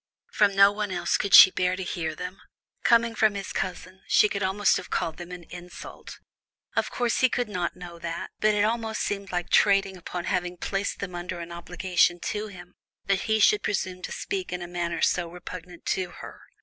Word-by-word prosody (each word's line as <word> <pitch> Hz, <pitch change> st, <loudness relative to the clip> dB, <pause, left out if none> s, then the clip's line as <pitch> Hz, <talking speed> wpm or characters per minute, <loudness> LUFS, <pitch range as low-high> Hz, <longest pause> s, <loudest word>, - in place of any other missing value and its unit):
From 200 Hz, -2 st, +3 dB
no 200 Hz, 0 st, +7 dB
one 205 Hz, 0 st, -3 dB
else 185 Hz, -, 0 dB
could 200 Hz, -2 st, +4 dB
she 190 Hz, -, +11 dB
bear 185 Hz, 0 st, 0 dB
to 190 Hz, -, -5 dB
hear 165 Hz, -3 st, -3 dB
them; 180 Hz, +3 st, -7 dB, 0.4 s
coming 235 Hz, -1 st, +4 dB
from 215 Hz, -2 st, +2 dB
his 200 Hz, -1 st, -5 dB
cousin, 185 Hz, 0 st, -5 dB
she -, -, +5 dB
could 200 Hz, -1 st, -4 dB
almost 190 Hz, +1 st, +2 dB
have -, -, -8 dB
called 160 Hz, -, -2 dB
them 175 Hz, 0 st, -9 dB
an 180 Hz, -1 st, -8 dB
insult. 180 Hz, 0 st, -10 dB, 0.6 s
Of -, -, +1 dB
course, 240 Hz, -2 st, 0 dB
he 255 Hz, -, +4 dB
could 245 Hz, 0 st, -1 dB
not 180 Hz, -4 st, -3 dB
know 175 Hz, -2 st, -10 dB
that, 170 Hz, 0 st, -5 dB
but 215 Hz, 0 st, +3 dB
it 205 Hz, -, +2 dB
almost 225 Hz, 0 st, -1 dB
seemed 200 Hz, -1 st, -3 dB
like 175 Hz, -1 st, -3 dB
trading 195 Hz, -2 st, +4 dB
upon 180 Hz, 0 st, -6 dB
having 180 Hz, -1 st, -2 dB
placed 195 Hz, +3 st, -3 dB
them 190 Hz, -3 st, -5 dB
under 175 Hz, 0 st, -5 dB
an 170 Hz, 0 st, -7 dB
obligation 175 Hz, 0 st, +1 dB
to 210 Hz, +1 st, -3 dB
him, 180 Hz, -2 st, -12 dB, 0.3 s
that 195 Hz, -1 st, 0 dB
he 220 Hz, 0 st, +3 dB
should 415 Hz, -, +5 dB
presume 185 Hz, -3 st, -2 dB
to -, -, -6 dB
speak 190 Hz, -2 st, -4 dB
in 180 Hz, 0 st, -4 dB
a -, -, -6 dB
manner 175 Hz, -1 st, -3 dB
so 175 Hz, -2 st, +1 dB
repugnant 180 Hz, 0 st, -10 dB
to 185 Hz, -2 st, -1 dB
her. -, -, -11 dB
185 Hz, 205 wpm, -26 LUFS, 175-205 Hz, 0.6 s, she